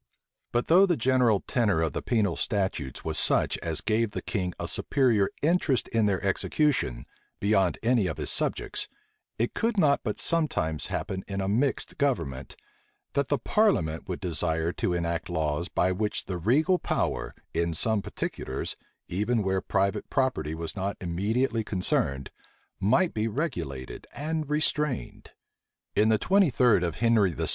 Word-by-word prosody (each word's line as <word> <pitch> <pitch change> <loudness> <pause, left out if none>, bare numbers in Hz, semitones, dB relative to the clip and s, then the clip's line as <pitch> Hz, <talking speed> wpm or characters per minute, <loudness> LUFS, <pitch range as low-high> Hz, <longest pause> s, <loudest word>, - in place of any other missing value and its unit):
But 120 0 +1
though 185 +4 +6
the 175 - +1
general 125 -4 +3
tenor 105 -9 +1
of 80 -3 0
the - - -3
penal 105 -8 +1
statutes 95 - -2
was - - +1
such - - +3
as 80 -2 -3
gave 115 0 +1
the - - -3
king 90 -5 -2
a - - -3
superior 120 -8 +2
interest 155 -5 +2
in 110 -2 +2
their 95 -2 +1
execution, 95 - 0 0.3
beyond 100 -3 +2
any 115 -4 +3
of - - -4
his - - -1
subjects, - - -1 0.5
it 115 +2 -1
could 230 -1 0
not 145 -6 +4
but 105 -4 -2
sometimes 110 - 0
happen 95 0 -3
in 100 -1 -3
a 95 - -1
mixed 125 +10 0
government, 70 - -1 0.6
that 140 - +1
the 145 - +1
parliament 100 - +1
would 90 - -3
desire 80 -2 0
to - - -1
enact 85 -1 -2
laws 80 0 -1
by 90 - +1
which 105 +3 -2
the 90 - -4
regal 150 - +3
power, - - -2 0.2
in 85 0 0
some 110 +6 +1
particulars, - - -4 0.3
even 105 +5 0
where 95 0 0
private 100 +1 0
property 130 - 0
was 80 -1 -5
not 100 0 -3
immediately 110 +7 0
concerned, 70 -9 0 0.5
might 130 - +2
be 110 +1 0
regulated 85 - -4
and 155 0 -3
restrained. 150 - -1 0.7
In 110 +1 +4
the 110 - +4
twenty 195 - +3
third 120 -7 +3
of 85 -3 -1
Henry 115 -6 +3
VI. - - -2
105 Hz, 155 wpm, -27 LUFS, 85-130 Hz, 0.7 s, though